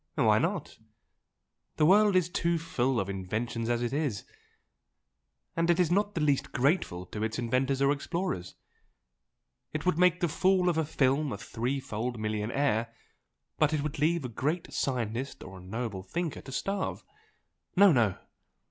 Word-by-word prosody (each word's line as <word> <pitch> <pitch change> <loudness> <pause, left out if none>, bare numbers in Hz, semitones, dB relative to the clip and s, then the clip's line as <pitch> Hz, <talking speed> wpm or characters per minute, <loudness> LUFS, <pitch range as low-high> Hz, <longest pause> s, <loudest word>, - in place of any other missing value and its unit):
"Why - - +4
not? - - -2 1.0
The 150 - +4
world 205 +3 +5
is 180 -3 +4
too 170 -1 0
full 135 -6 0
of 95 - -1
inventions 110 +5 -3
as 120 0 +1
it 120 - -2
is 140 -9 -1 1.3
and 165 +1 +1
it 170 +1 +4
is 175 -2 +3
not 205 +3 +1
the 165 - 0
least 145 -3 +1
grateful 130 - +1
to 105 +3 -6
its 110 0 -1
inventors 130 +3 0
or 140 - +4
explorers. 145 - -3 1.2
It 155 +1 -3
would 180 -3 +2
make 180 -1 +4
the 175 - +2
fool 185 +3 +2
of 165 -2 +1
a 160 - +1
film 140 0 +1
a - - -3
three 125 +4 -3
fold 120 -1 -4
millionaire 110 +2 0 0.7
but 155 0 +3
it 150 -2 0
would 150 -1 -4
leave 160 0 +1
a - - -3
great 150 +9 -2
scientist 125 0 -2
or 95 -1 -10
a - - -13
noble 105 0 -4
thinker 155 - -4
to 130 - -10
starve. 195 +8 -2 0.7
No, 200 0 +7
no! 115 - +2
140 Hz, 165 wpm, -29 LUFS, 115-170 Hz, 1.3 s, No